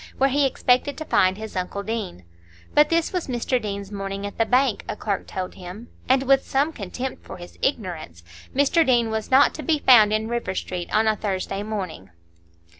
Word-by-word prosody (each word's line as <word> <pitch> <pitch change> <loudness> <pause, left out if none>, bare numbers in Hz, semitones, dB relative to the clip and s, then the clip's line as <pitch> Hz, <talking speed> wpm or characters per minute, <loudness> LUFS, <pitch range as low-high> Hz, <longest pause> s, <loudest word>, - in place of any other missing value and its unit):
where 270 0 +3
he 280 +1 +3
expected 255 +2 +1
to 315 - -5
find 185 -7 +3
his 220 0 -8
uncle 185 +2 -3
Deane. 210 - -4 0.5
But 295 0 +5
this 335 +1 +1
was 360 -2 -2
Mr 250 0 -1
Deane's 200 -1 -5
morning 195 0 -4
at 205 - -7
the 225 - +2
bank, 250 -3 +2
a - - -2
clerk 200 -2 -3
told 185 -1 -5
him, 185 +6 -10 0.2
and 260 +1 +4
with 270 0 +4
some 285 +4 0
contempt 250 +5 -6
for - - -9
his 175 0 -12
ignorance; 175 - -3 0.3
Mr 285 +5 +3
Deane 240 -5 +2
was 220 -1 -3
not 265 +2 +5
to - - -6
be 305 +2 +1
found 235 -7 +6
in 215 +1 0
River 235 -5 -3
Street 180 -2 -4
on 220 +1 +3
a 215 - +3
Thursday 195 -1 -3
morning. 190 - -5
220 Hz, 195 wpm, -23 LUFS, 195-265 Hz, 0.5 s, found